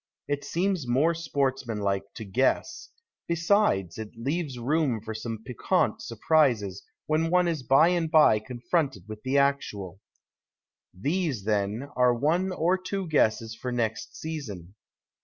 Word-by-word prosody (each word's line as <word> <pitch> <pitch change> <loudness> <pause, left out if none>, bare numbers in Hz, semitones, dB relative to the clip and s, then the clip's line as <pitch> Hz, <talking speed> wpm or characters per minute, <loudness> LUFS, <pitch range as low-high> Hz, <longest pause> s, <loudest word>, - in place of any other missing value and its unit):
It 145 0 -2
seems 175 -1 -1
more 140 +8 +3
sportsmanlike 120 -11 -2
to 110 - -7
guess; 130 - 0 0.4
besides, 170 - +1
it 110 0 -7
leaves 140 +2 -2
room 135 -1 0
for 110 +1 -6
some 110 0 -6
piquant 125 -2 0
surprises 120 - +1 0.2
when 155 +2 +1
one 180 0 +3
is 165 -4 -1
by 135 +7 +5
and 170 -2 0
by 150 -9 +6
confronted 125 - -2
>\ith 110 -1 -8
the 130 +2 +1
actual. 105 -10 0 0.9
These, 140 - -2
then, 105 +4 -1
are 125 -1 +4
one 165 +9 +1
or 180 +2 +1
two 190 0 -4
guesses 115 -6 +2
for 125 +3 -5
next 115 -3 -2
season. 105 - -6
130 Hz, 135 wpm, -27 LUFS, 110-160 Hz, 0.9 s, by